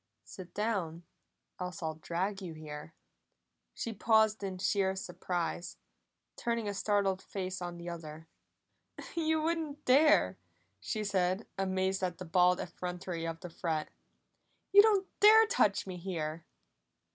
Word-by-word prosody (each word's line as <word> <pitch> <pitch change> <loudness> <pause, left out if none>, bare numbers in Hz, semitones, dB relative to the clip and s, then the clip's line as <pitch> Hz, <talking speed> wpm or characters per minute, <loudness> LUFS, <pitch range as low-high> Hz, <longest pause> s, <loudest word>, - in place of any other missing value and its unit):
"Sit 180 -2 -11
down, 190 -6 -1 0.6
else 180 0 -5
I'll 160 0 -1
drag 180 +5 -3
you 170 -4 -6
here!" 155 0 -9 0.8
She 230 - -3
paused 220 0 +3
in 190 -2 -4
sheer 190 0 +1
surprise, 180 -2 -3 0.6
turning 235 -2 -1
a 205 - -1
startled 200 -2 +1
face 185 -1 -5
on 175 -1 -5
the 170 0 -8
other. 160 -2 -7 0.9
"You 320 -1 +1
wouldn't 315 -3 -2
dare!" 260 - +5 0.4
she 215 - -3
said, 190 0 0
amazed 190 0 0
at 180 -2 -1
the 185 - -7
bald 180 +1 +4
effrontery 180 -1 -4
of 165 0 -5
the 180 - -7
threat. 160 -2 -2 0.8
"You 405 +1 +10
don't 405 -3 +3
dare 440 +2 +8
touch 430 - +2
me 185 -2 -6
here!" 165 -3 -4
185 Hz, 135 wpm, -32 LUFS, 170-215 Hz, 0.9 s, You